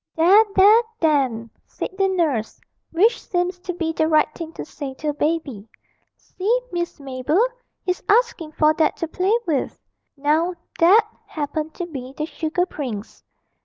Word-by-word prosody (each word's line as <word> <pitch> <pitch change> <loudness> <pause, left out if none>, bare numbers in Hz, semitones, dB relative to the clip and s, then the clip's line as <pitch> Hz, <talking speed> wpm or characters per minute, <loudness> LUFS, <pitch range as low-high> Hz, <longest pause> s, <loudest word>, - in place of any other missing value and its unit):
'There, 370 +7 +6
there, 415 +4 +7 0.2
then!' 265 -8 +1 0.2
said - - -5
the 390 0 +2
nurse 315 - -1 0.3
(which 420 +8 +2
seems 360 0 -2
to 360 0 -5
be 335 -2 -2
the 315 0 +1
right 310 -1 +3
thing 330 -2 -7
to - - -7
say 280 -3 -7
to 305 +3 -3
a - - -1
baby). 290 -8 -2 0.5
'See, 440 +7 -1
Miss 345 -3 -3
Mabel, 270 +4 -1 0.5
he's 360 -1 -1
asking 420 -9 +2
for 305 0 +3
that 315 - +2
to 330 - -3
play 375 +7 +1
with.' 295 -6 -1 0.4
Now 315 +5 +1 0.2
that 410 +7 +6 0.2
happened 310 +1 -4
to 355 - -4
be 270 -5 -8
the 305 - -1
sugar 325 +2 -1
prince. 245 - -7
320 Hz, 160 wpm, -22 LUFS, 290-360 Hz, 0.5 s, there